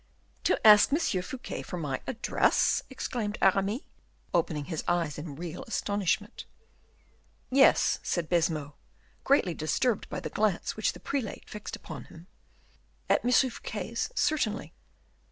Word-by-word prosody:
"To - - +3
ask 210 +2 +8
M. 290 - +4
Fouquet 240 - -3
for 180 - -6
my 145 -6 -3
address?" 240 -2 +2
exclaimed 235 -5 -3
Aramis, 195 +5 +2 0.5
opening 160 -4 0
his 160 -2 -4
eyes 170 -4 0
in 150 -2 -7
real 170 +2 -6
astonishment. 205 -2 -1 1.1
"Yes," 270 +1 +5
said 170 -3 -1
Baisemeaux, 160 -4 0 0.5
greatly 265 -11 +3
disturbed 200 +9 0
by - - -4
the - - -6
glance 210 -4 0
which 215 - 0
the - - -11
prelate 265 -7 -4
fixed 210 -1 -7
upon 160 -4 -9
him, 165 +1 -14 0.9
"at - - +3
M. 245 - +1
Fouquet's 230 -4 0
certainly." 230 -8 0
195 Hz, 130 wpm, -29 LUFS, 165-230 Hz, 1.1 s, ask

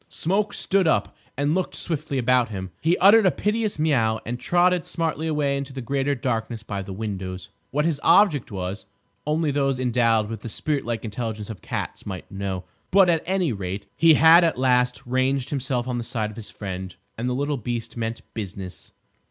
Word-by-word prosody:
Smoke 200 +5 0
stood 195 -3 +1
up - - +1 0.2
and 145 +2 +1
looked 185 0 -1
swiftly 155 -4 -2
about 125 -1 +3
him. 95 -3 -6
He 165 +3 +2
uttered 205 +2 +7
a - - +7
piteous 210 +1 -1
meow 120 -8 +2
and 120 +2 -4
trotted 180 +2 +2
smartly 160 -1 -2
away 150 -3 +1
into 140 0 -4
the 135 - -5
greater 140 +3 0
darkness 115 -3 -2
by 100 -3 -4
the 95 - -8
windows. 95 -3 -5 0.2
What 150 +3 0
his 160 -4 0
object 165 - +4
was 95 +1 -5 0.4
only 155 0 +1
those 135 -2 0
endowed 115 -3 +2
with 110 -1 -6
the 115 - -6
spirit 145 +5 -2
like 120 0 -3
intelligence 110 -1 -4
of 105 - -10
cats - - -4
might 95 -2 -7
know. 95 -2 -3 0.3
But, 190 -2 +5
at 165 -2 +1
any 185 -7 +1
rate, 100 0 -5
he 165 -1 +6
had 165 +3 +7
at 165 -5 +1
last 125 0 +2
ranged 130 +1 0
himself 130 -3 -1
on 125 -1 -2
the - - -3
side 110 -2 -3
of - - -13
his 110 -2 -8
friend. 95 -2 -6 0.2
And 120 +3 -2
the 125 - -1
little 145 +2 -1
beast 115 -1 -4
meant 115 -1 -4
business. 95 -4 -7
125 Hz, 195 wpm, -24 LUFS, 110-155 Hz, 0.4 s, uttered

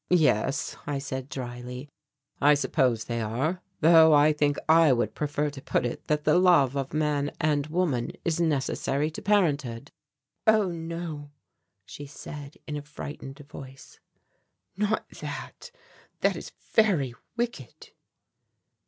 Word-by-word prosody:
"Yes," 145 -6 +2
I 145 -1 -1
said 135 -1 -5
dryly, 125 +1 -6 0.5
"I 145 +1 +6
suppose 130 -4 +1
they 115 -1 -3
are, 135 +12 -1 0.2
though 160 -1 +7
I 150 +1 +5
think 145 -1 +1
I 160 -1 +6
would 120 -4 +1
prefer 150 0 -1
to 135 -1 -10
put - - 0
it 120 - -5
that 150 0 0
the 155 +4 +4
love 170 -8 +4
of 135 -1 -2
man 150 -1 0
and 150 -2 +1
woman 155 -7 0
is 170 0 0
necessary 150 -1 0
to - - -8
parenthood." 145 - +1 0.6
"Oh, 215 -4 +4
no," 165 -3 -6 0.6
she 145 +7 -9
said 145 0 -9
in 150 -1 -4
a - - -4
frightened 145 -2 -8
voice, 135 -2 -12 0.8
"not 210 +2 0
that, - - -7 0.5
that - - +3
is - - -8 0.2
very 180 - +3 0.2
wicked." 235 - -5
145 Hz, 135 wpm, -27 LUFS, 135-165 Hz, 0.8 s, though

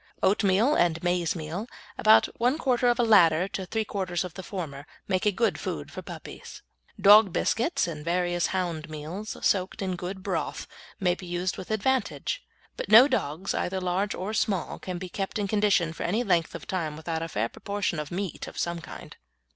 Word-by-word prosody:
Oatmeal 200 +6 +3
and 170 - +2
maizemeal, 175 +2 -1 0.3
about 215 0 +6
one 250 +5 +2
quarter 250 -5 +1
of 240 -1 +3
the 240 - +3
latter 180 -5 +5
to 190 -2 -5
three 220 +2 -1
quarters 185 -4 -2
of 180 -2 -7
the 190 - -7
former, 155 -7 -6 0.2
make 185 +2 +1
a - - +5
good 230 +4 0
food - - -5
for - - -7
puppies. - - -10 0.4
Dog 205 0 +7
biscuits 245 - +1
and 165 -3 -5
the 150 - -11
various 175 0 +1
hound 170 -4 -3
meals, 160 +8 -6
soaked 190 -1 +1
in 185 -2 -2
good 185 +2 -6
broth, 175 -7 -3 0.3
may 180 -2 +2
be 180 0 -9
used 175 +1 -2
with 185 - -8
advantage, 260 - 0 0.3
but - - -5
no 225 +5 +9
dogs, 190 - -1
either 190 +1 -1
large 185 +3 -1
or 195 +4 -4
small, 205 -4 -1
can 185 -1 -5
be 185 +1 -6
kept 195 +4 -4
in 205 -1 -1
condition 200 -5 +2
for - - -9
any 210 +8 0
length 175 -7 +1
of - - -7
time 160 -5 -3
without 160 0 -3
a 165 - -3
fair 115 -7 -1
proportion 200 +2 -3
of 150 -1 -5
meat 185 0 -4
of - - -10
some 170 -1 -2
kind. - - -10
185 Hz, 195 wpm, -27 LUFS, 170-205 Hz, 0.4 s, no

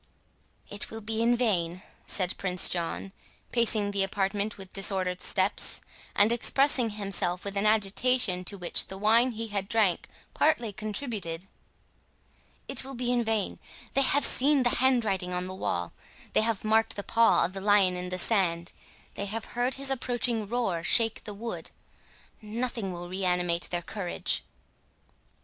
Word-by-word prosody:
"It 205 0 -3
will 225 - -8
be 220 +1 -2
in 240 +1 +3
vain," 185 -6 -1 0.2
said 185 -2 0
Prince 180 -2 +3
John, 175 +2 -2 0.4
pacing 215 -3 +1
the 200 -1 0
apartment 200 +2 -1
with 190 -2 -11
disordered 190 -2 0
steps, 190 +1 0 0.4
and 205 +3 +5
expressing 250 +1 +2
himself 195 -3 -2
with 200 0 -4
an 200 +2 +2
agitation 215 -1 +1
to 200 - -1
which 180 -2 0
the 190 - -7
wine 230 +5 +3
he 225 0 -5
had 200 -1 -3
drank 215 -6 +1 0.3
partly 240 -8 +1
contributed—"It 210 -5 -8
will 270 0 -8
be 245 0 -1
in 240 -1 +1
vain—they 225 +4 -3
have 275 +1 +7
seen 280 0 +5
the 245 - +2
handwriting 220 -8 +1
on 180 0 -2
the 185 - -6
wall—they 85 - -4
have 220 -2 -1
marked 220 +1 +2
the 200 - -5
paw 230 +2 +3
of 185 - -5
the 195 - -6
lion 200 -2 +4
in 180 0 -4
the 185 - -3
sand—they 180 0 -2
have 220 +3 -4
heard 245 +2 0
his 275 0 -1
approaching 240 -4 -1
roar 200 -7 -2
shake 225 +4 +3
the 210 - -6
wood—nothing 225 0 -7
will 175 0 -7
reanimate 180 -2 -1
their 175 -1 -2
courage." 185 -1 -2
205 Hz, 145 wpm, -28 LUFS, 185-230 Hz, 0.4 s, have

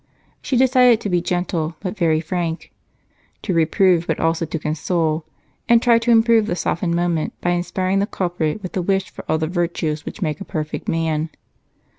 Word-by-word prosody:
She 260 - -1
decided 250 -2 +5
to 205 - -3
be 175 -1 +2
gentle, 175 -2 -2
but 190 0 -4
very 160 -5 +2
frank; 170 0 -3 0.7
to 190 - -1
reprove, 170 +1 +3
but - - -1
also 165 0 0
to 160 - -3
console; 155 +1 -1 0.4
and 235 0 +7
to - - -9
try 235 -1 +5
to 230 +1 -2
improve 225 -1 +5
the 175 - -1
softened 170 0 -1
moment 170 -2 0
by 175 - 0
inspiring 185 +2 0
the 200 - 0
culprit 175 -1 -2
with 185 - -6
a 185 - 0
wish 195 +1 0
for - - -9
all 160 - +2
the 160 - -1
virtues 165 -3 -2
which - - -8
make 155 0 -2
a - - -2
perfect 155 -6 -5
man. 160 -1 0
175 Hz, 190 wpm, -20 LUFS, 160-195 Hz, 0.7 s, and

